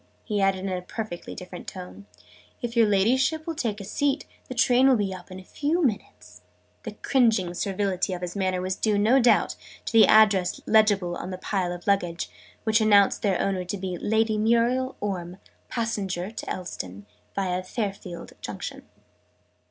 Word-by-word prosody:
he 210 -2 -1
added 195 -1 +2
in - - -1
a 185 -1 -2
perfectly 180 -1 -6
different 180 -1 -9
tone. 190 +2 -9 0.5
"If 240 -1 -4
your 230 -2 +5
Ladyship 260 +10 +2
will 330 - -2
take 230 -9 -2
a - - -6
seat, 280 +7 -1 0.2
the 255 - -6
train 250 +2 +4
will 265 - +6
be 200 -4 -1
up 185 0 -10
in 185 0 -8
a - - -12
few 305 - 0
minutes." 90 - -4 0.4
The 220 - -7
cringing 220 -9 +3
servility 195 +1 -1
of 180 0 -5
his 175 +1 -4
manner 185 -2 0
was 185 0 -1
due, 210 0 +1
no 225 +6 +4
doubt, 240 -1 +3 0.3
to - - -4
the 225 - +7
address 200 -4 +5
legible 205 -5 +3
on 180 - -6
the 185 - -5
pile 185 -2 -1
of 175 0 -7
luggage, 175 -4 0 0.3
which 220 0 +3
announced 205 -2 +5
their 195 -4 +1
owner 190 -2 0
to 180 +3 -4
be 185 -1 -4
"Lady 220 +3 +1
Muriel 235 +4 +2
Orme, 180 -3 -3 0.3
passenger 205 -5 -2
to 225 - -7
Elveston, 100 - -6 0.3
via 185 -2 -1
Fayfield 195 -3 -5
Junction." - - -6
200 Hz, 175 wpm, -26 LUFS, 185-225 Hz, 0.5 s, the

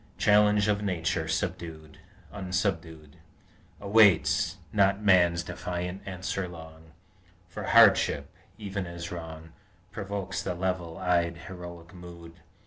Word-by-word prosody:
Challenge 105 0 +4
of 105 -1 +1
Nature 85 -4 -1 1.0
unsubdued 90 -6 -3 0.6
Awaits 100 -4 +3 0.2
not 100 -1 +3
Man's 85 -4 +4
defiant 90 +3 -5
answer 95 0 -3
long; 80 -1 -13 0.5
For 85 - -8
hardship, - - +4 0.2
even 100 -3 -5
as 85 0 -7
wrong, 80 -2 -8 0.4
Provokes 100 -2 -4
the 90 - -3
level 90 -2 -3
eyed 85 -2 0
heroic 85 -2 -10
mood. 85 -2 -12
90 Hz, 100 wpm, -28 LUFS, 85-100 Hz, 1.0 s, Challenge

